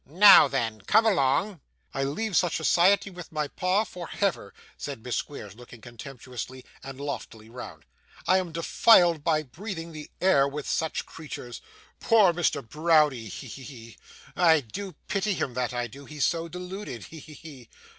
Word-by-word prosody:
'Now 180 0 +8
then, 115 -6 -2
come 225 - +3
along.' 180 0 +1 0.3
'I 135 - -1
leave 195 +9 -3
such 175 -1 +2
society, 195 +3 +3
with 180 -1 -10
my 150 -2 -2
pa, 185 +7 0
for 180 -6 -8
Hever,' 185 - -2 0.2
said 140 -6 -7
Miss 125 -1 -2
Squeers, 105 -9 -6
looking 120 +1 -14
contemptuously 125 +2 -9 0.2
and 135 0 -9
loftily 115 -6 -7
round. 90 -11 -10 0.4
'I 185 +3 +4
am 180 -3 -5
defiled 170 -1 +4
by 155 -1 +1
breathing 165 - -7
the 155 -2 -9
air 140 -7 +4
with 145 +1 -6
such 160 - -1
creatures. 145 -6 -9 0.4
Poor 210 -6 +4
Mr. 165 -7 -1
Browdie! 150 -6 +2
He! - - -8
he! 135 - -9
he! 115 -5 -11 0.4
I 165 -3 +5
do 175 - -7
pity 200 +1 0
him, 130 - -3
that 125 0 -2
I 120 -1 -2
do; 135 +5 -11
he's 150 -1 -1
so 165 0 -1
deluded. 180 - -7
He! 160 - -11
he! 145 -4 -13
150 Hz, 165 wpm, -26 LUFS, 125-180 Hz, 0.4 s, Now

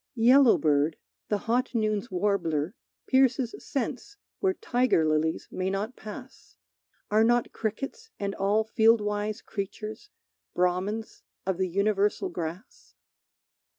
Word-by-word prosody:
Yellowbird, 225 - +4 0.3
the 210 - +2
hot 240 +4 -1
noon's 215 0 0
warbler, 180 -4 0 0.3
pierces 260 -2 +3
Sense 275 - -4 0.2
where 380 -1 +1
tiger 245 -10 +2
lilies 155 +1 0
may 185 0 -2
not 205 +6 -3
pass. 250 +5 -11 0.5
Are 215 +1 +5
not 240 +1 +2
crickets 270 - -4
and 200 -1 -2
all 205 +3 +2
field 225 0 +4
wise 210 0 -2
creatures 215 - -6 0.5
Brahmins 185 +5 -1 0.2
of 190 -1 -1
the 190 - +1
universal 200 +1 +1
grass? 180 - -7
210 Hz, 115 wpm, -27 LUFS, 190-240 Hz, 0.5 s, Are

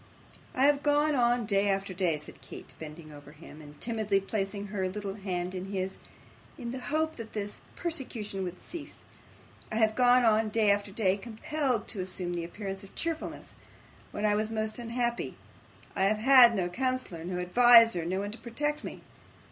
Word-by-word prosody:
'I 260 - +2
have 285 0 +4
gone 295 +1 +3
on 240 -2 +2
day 200 -1 +2
after 195 -1 -1
day,' 175 -4 +1
said 150 - -12
Kate, - - -11
bending 155 0 -9
over 145 0 -13
him, 155 0 -13
and 150 -1 -13
timidly 215 -4 0
placing 200 0 -3
her 190 -2 -2
little 200 0 -4
hand 185 -3 -3
in 185 0 -4
his, 190 -1 -3 0.6
'in 235 -3 -5
the 260 - -5
hope 315 +4 -1
that 230 -2 -8
this 205 -1 -4
persecution 245 - -4
would 180 0 -5
cease; 320 -4 -9 0.7
I - - -3
have 220 -1 +3
gone 250 0 +5
on 220 -1 +3
day 210 -1 +3
after 205 0 0
day, 195 -2 +1
compelled 240 +3 -2
to 210 - -5
assume 185 -1 -4
the 170 -1 -2
appearance 195 +2 -6
of 195 - -15
cheerfulness, 330 -1 -4 0.6
when 205 - -2
I 210 - +4
was 215 +1 0
most 220 0 -2
unhappy. 235 0 -2 0.6
I 190 - +2
have 215 +2 +2
had 245 0 +7
no 185 -3 0
counsellor, 255 -5 -2
no 180 +1 -3
adviser, 230 0 +6
no 185 +3 -1
one 205 +1 -4
to 225 - -8
protect 295 +5 -2
me. - - -7
210 Hz, 180 wpm, -29 LUFS, 190-240 Hz, 0.7 s, had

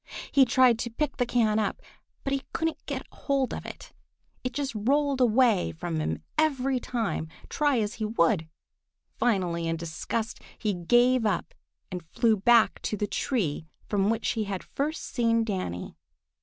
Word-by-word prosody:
He 275 -2 +6
tried 250 -2 +4
to 235 - -2
pick 280 +5 -2
the 245 -2 +1
can 220 -3 +2
up, 210 - -1 0.4
but 275 - -1
he 275 - 0
couldn't 325 -1 -2
get - - -4
hold 275 -2 -1
of - - -6
it. - - -10 0.5
It 255 - -2
just 280 0 -3
rolled 275 +5 +1
away 235 -4 +4
from 160 0 -3
him 155 - -2 0.2
every 270 -4 +2
time, 230 -9 -2 0.2
try 290 -3 +2
as 210 -1 -1
he - - +1
would. 170 -5 +2 0.7
Finally, 180 -7 +1
in 165 0 -1
disgust, 170 +7 -3 0.2
he 210 -2 0
gave 240 +8 +3
up 205 -5 -1 0.4
and 180 -1 -4
flew 220 +7 +2
back 225 +3 +4
to 210 - -2
the 210 - 0
tree 180 - -1 0.2
from 200 -1 +1
which 225 0 0
he 220 -2 -1
had 195 -2 -4
first 300 +3 -3
seen 230 -2 +1
Danny. 185 - -4
225 Hz, 165 wpm, -27 LUFS, 195-255 Hz, 0.7 s, He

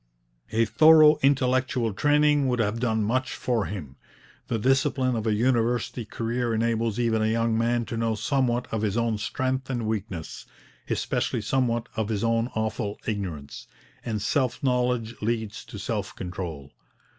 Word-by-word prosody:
A 115 +1 +3
thorough 155 +6 +6
intellectual 130 -4 +2
training 150 +3 +3
would 125 -1 +1
have 110 0 0
done 110 -3 +1
much 130 +5 -1
for 120 -5 0
him. 75 -10 -7 0.5
The 115 - -1
discipline 130 +1 +1
of 110 0 -2
a 110 - +3
university 120 0 0
career 115 +2 -2
enables 115 -1 0
even 115 -2 +1
a 110 - +2
young 115 0 +1
man 115 +1 +1
to 115 - -5
know 115 -1 0
somewhat 125 0 0
of 110 - -1
his 105 0 0
own 115 -2 0
strength 130 +4 -2
and 120 -4 -2
weakness, 100 -6 -4 0.4
especially - - -1
somewhat 120 +1 0
of 110 -1 -1
his 105 -1 -1
own 115 +1 +1
awful 110 -1 -2
ignorance; 90 -10 -5 0.4
and 110 -3 -2
self 130 +2 0
knowledge 125 -3 0
leads 110 -1 -2
to - - -9
self 105 0 -3
control. 85 -6 -6
115 Hz, 155 wpm, -26 LUFS, 110-125 Hz, 0.5 s, thorough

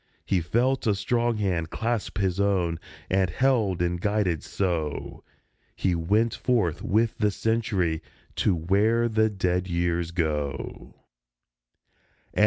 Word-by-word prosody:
He 95 -3 +1
felt 120 +9 +1
a 105 - +3
strong 120 +3 0
hand 90 -6 -1
clasp 115 +1 -2
his 95 -2 0
own, 90 -5 +1 0.3
and, 95 -1 +2
held 105 -4 +1
and 85 0 -1
guided 100 -6 +1
so, 85 -6 -3 0.5
He 95 - +1
went 105 +8 +1
forth 110 -11 0
with 110 +2 +1
the 105 -1 +3
Century 100 -7 0 0.4
to 95 - +2
where 105 +8 +2
the 110 -1 +2
dead 90 -2 -1
Years 85 -1 0
go 75 -5 -1
104 - - -10 1.3
A. - - -2
95 Hz, 130 wpm, -26 LUFS, 85-110 Hz, 1.3 s, a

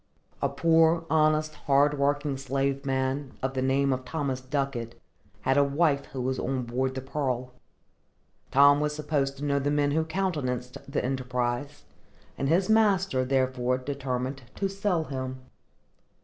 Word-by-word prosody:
A - - +2
poor, 165 0 +3
honest, 155 0 +3
hard 145 0 +2
working 145 0 +1
slave 135 +1 -2
man, 135 +1 -1
of 135 0 -1
the 130 - -1
name 135 +1 +2
of 130 0 -4
Thomas 135 -2 -3
Ducket, 130 -3 -3 0.4
had 135 +1 +2
a 145 - +6
wife 140 0 +1
who 130 - -5
was 130 +1 -1
on 130 -1 -1
board 130 +2 -2
the 130 - -3
Pearl. 130 -2 -3 1.0
Tom 140 +1 +6
was 150 0 -1
supposed 140 -2 -1
to 140 - -7
know 140 -1 +1
the 140 +1 0
men 145 -1 +2
who 160 +2 +2
countenanced 150 -8 -2
the - - -1
enterprise, 125 +1 -2 0.5
and 135 - -1
his 180 +4 +3
master, 195 -10 +3
therefore, 130 -1 +1
determined 130 0 -3
to 195 - 0
sell 195 -3 0
him. 130 -3 -5
140 Hz, 150 wpm, -27 LUFS, 130-150 Hz, 1.0 s, a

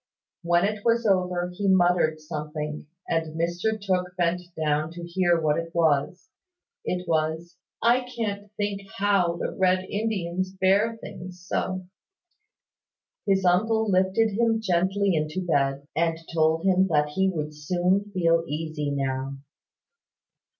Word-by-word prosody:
When 175 +1 +3
it 210 0 -2
was 235 0 +2
over, 180 -3 +1
he 200 +2 -2
muttered 175 -4 +3
something, 150 -1 -5 0.2
and 160 -1 -2
Mr 175 +6 0
Tooke 180 -2 -1
bent 175 0 +1 0.2
down 155 0 0
to 175 0 -8
hear 175 0 +2
what 155 0 +1
it 165 0 -7
was. 160 - +1 0.5
It 180 0 -3
was 160 +1 -1 0.3
"I 245 +2 +3
can't 205 -3 -3
think 205 -1 -2 0.2
how 195 -4 +2
the - - -3
Red 185 0 +2
Indians 190 -4 -2
bear 195 +4 +2
things 180 -4 -10
so." 185 0 -2 1.4
His 195 -1 +2
uncle 220 +4 +2
lifted 190 +4 +2
him 225 +2 +2
gently 190 0 +1
into 155 +4 -2
bed, 140 -3 0
and 165 0 +1 0.2
told 160 0 +2
him 190 0 +4
that 150 -4 +2
he 190 +5 +1
would 155 -4 -3
soon 180 +6 0
feel 165 -3 +2
easy 155 -1 -3
now. 135 -1 -2
180 Hz, 135 wpm, -25 LUFS, 160-195 Hz, 1.4 s, him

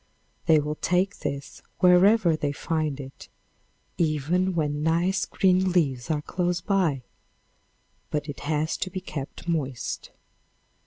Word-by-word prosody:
They 160 -1 +6
will 150 +1 -2
take 185 +5 0
this 140 0 -5 0.2
wherever 180 0 +5
they 145 -2 -1
find 155 -3 -2
it, 135 -1 -10 0.7
even 170 +4 +1
when 150 -2 0
nice 175 +5 +1
green 185 -1 +2
leaves 135 -9 +1
are 150 -2 0
close 175 +1 -1
by, 175 -10 +1 1.1
but 150 0 -2
it 145 - -6
has 155 +1 -1
to - - -3
be 185 +1 -4
kept 145 -2 -7
moist. 140 -7 -2
160 Hz, 125 wpm, -26 LUFS, 145-180 Hz, 1.1 s, They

